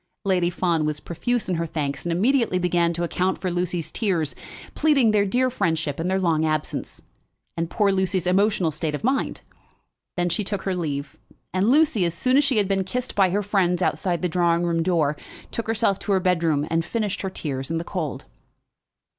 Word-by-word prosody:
Lady 180 -3 +2
Fawn 170 -3 0
was 150 -1 -1
profuse 235 +10 -2
in 180 -2 0
her 165 0 -2
thanks, 145 -2 -3
and 175 - -1
immediately 230 +3 +2
began 175 -1 +2
to 170 +1 -3
account 185 +2 0
for 185 0 -2
Lucy's 175 -2 -2
tears, 175 -9 0 0.4
pleading 280 -7 +3
their 205 -1 +2
dear 255 +5 +1
friendship 160 - -1
and 170 +2 -1
their 190 0 +1
long 165 -4 +1
absence, 155 -1 -3 0.5
and 165 0 -2
poor 205 0 +2
Lucy's 190 -2 0
emotional 185 -2 +2
state 150 0 -2
of - - -7
mind. 265 +3 0 0.8
Then 175 0 +1
she 175 +5 -1
took 200 0 -4
her 190 - -1
leave, 145 -4 -4 0.4
and 190 +4 +2
Lucy, 285 - +4
as 170 -1 0
soon 255 +8 +1
as 285 - +5
she 275 -5 +1
had 205 -2 +3
been 195 -1 +1
kissed 250 +7 -4
by 195 -2 +3
her 205 +3 0
friends 185 -3 +1
outside 175 -1 0
the - - +3
drawing 170 0 +2
room 170 -1 +1
door, 160 -4 +1 0.3
took 230 - -4
herself 210 -3 +1
to 205 - -1
her 190 - +3
bedroom, 165 -5 +1
and 165 0 +2
finished 210 +2 -2
her 190 - -2
tears 135 -7 -4
in 165 - -1
the 165 - -2
cold. 165 -4 -4
180 Hz, 200 wpm, -24 LUFS, 165-200 Hz, 0.8 s, as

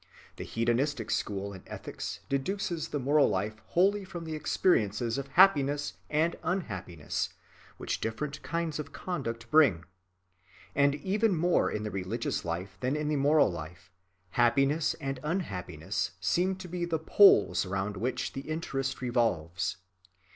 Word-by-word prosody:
The - - -5
hedonistic 120 +1 0
school 100 0 -2
in 95 - -10
ethics - - -6
deduces 170 +4 -2
the - - -3
moral 145 +2 +4
life 105 +3 -2
wholly 200 +3 +2
from 175 -3 -7
the 160 - -4
experiences 115 - +1
of 140 - -5
happiness 145 -4 +4 0.2
and 160 +3 +1
unhappiness 95 - -3 0.5
which - - -3
different 140 +6 -3
kinds 165 -2 -2
of 145 -2 -6
conduct 125 -11 -4
bring; 130 - +5 0.9
and, 140 0 +3
even 200 +5 +1
more 175 +2 +2
in 105 - -3
the 105 - -3
religious 95 -1 -2
life 90 +3 -4
than 130 +3 0
in 150 0 -1
the 150 - +1
moral 145 -4 +4
life, 85 +2 -9 0.4
happiness 135 +7 +3
and 135 -1 -4
unhappiness 95 - -3
seem 185 +2 +1
to 185 0 -9
be 175 0 -3
the 170 -2 0
poles 160 - +5
round 95 +2 -2
which 120 +7 -2
the 135 - -4
interest 135 -5 -2
revolves. 90 -9 0
135 Hz, 140 wpm, -30 LUFS, 105-160 Hz, 0.9 s, bring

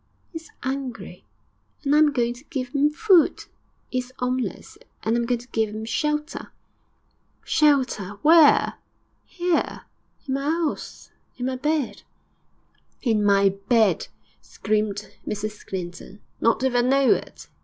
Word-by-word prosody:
''E - - -4
is 325 - -12
'ungry, 260 -3 -5 0.6
and 280 0 +1
I 300 - +6
am 305 -1 +5
going 240 -3 0
to 245 +2 -15
give 260 -5 -5
'im 285 +1 +4
food; 345 +2 +3 0.5
'e 255 - 0
is 250 0 -7
'omeless, 250 0 -3 0.2
and 225 - +1
I - - +2
am 235 - -1
going 245 0 +1
to 245 - -16
give 220 -2 0
'im 215 +1 -6
shelter.' 300 +5 -2 0.9
'Shelter? 255 -10 +2
Where?' 315 -1 +6 0.5
'Here, 350 -1 -1 0.4
in 265 - -1
my 275 +1 -1
'ouse, 320 0 -3 0.3
in 245 - -3
my 260 0 -1
bed.' 295 0 -1 1.0
'In 220 -5 +2
my 200 -1 +4
bed!' 205 +3 +1 0.3
screamed 210 -1 -2 0.2
Mrs 210 0 -4
Clinton. 185 +1 -7 0.2
'Not 230 +2 +2
if 265 -1 +1
I 245 - +4
know 265 +2 +3
it! - - -7
250 Hz, 145 wpm, -24 LUFS, 215-295 Hz, 1.0 s, I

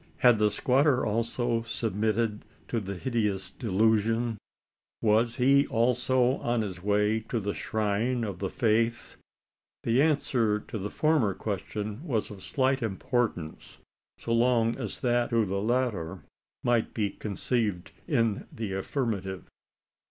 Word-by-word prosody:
Had 120 -3 +5
the 105 0 +4
squatter 130 +5 +2
also 115 +2 0
submitted 110 -1 -1 0.3
to 115 - 0
the 100 -1 -5
hideous 105 -2 -1
delusion? 110 +1 +1 0.6
Was 115 +2 +2
he 140 +2 +4
also 125 +2 +2
on 120 -1 0
his 95 -4 -6
way 105 +2 +2
to 120 - 0
the 100 -1 -2
shrine 110 +3 -1
of 100 -5 -4
the 95 - -2
faith? 115 +2 0 0.7
The 120 +4 +3
answer 125 -8 +2
to 110 - -7
the 100 +2 -3
former 145 -11 +2
question 105 - -4
was 120 -12 -1
of 100 -2 -10
slight 135 +3 +1
importance, 110 -5 -2 0.4
so 115 - -3
long 115 -1 +3
as 115 -7 -4
that 120 -1 +2
to 115 -2 +2
the 100 0 -2
latter 105 - -1 0.4
might 120 -2 +1
be 105 -3 0
conceived 105 -2 -2 0.2
in 115 - +1
the 110 -4 -4
affirmative. 95 -3 -2
115 Hz, 130 wpm, -28 LUFS, 105-120 Hz, 0.7 s, Had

